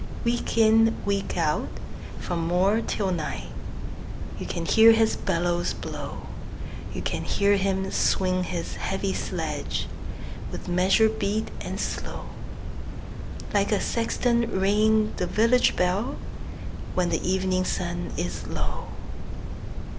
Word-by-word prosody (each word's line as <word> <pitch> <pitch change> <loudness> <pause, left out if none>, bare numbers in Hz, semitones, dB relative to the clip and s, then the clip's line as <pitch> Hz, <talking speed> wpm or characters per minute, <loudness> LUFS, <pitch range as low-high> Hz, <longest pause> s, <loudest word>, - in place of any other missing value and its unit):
Week 235 0 0
in, 225 0 +6
week 200 -2 0
out, 155 -3 +1 0.5
from 170 -2 -2
morn 190 +6 +3
till 195 -3 0
night, 150 - -3 0.9
You - - -4
can 170 - -2
hear 225 +4 +8
his 225 0 +4
bellows 175 +1 0
blow; - - -6 0.7
You - - -4
can - - -1
hear 200 0 +3
him 190 -1 +1
swing 185 -1 +2
his 175 -2 -3
heavy 195 0 -1
sledge, 155 -5 -2 0.6
With - - -6
measured 190 +5 +4
beat 215 +2 0
and - - -4
slow, - - -3 1.2
Like 200 0 +3
a 210 - +4
sexton 235 0 +1
ringing 215 +2 +4
the 180 - 0
village 230 +6 +4
bell, 185 +7 +1 0.8
When 180 -1 +2
the - - +1
evening 185 0 +2
sun 175 -1 -2
is 90 -2 -2
low. - - -3
190 Hz, 120 wpm, -26 LUFS, 175-220 Hz, 1.2 s, hear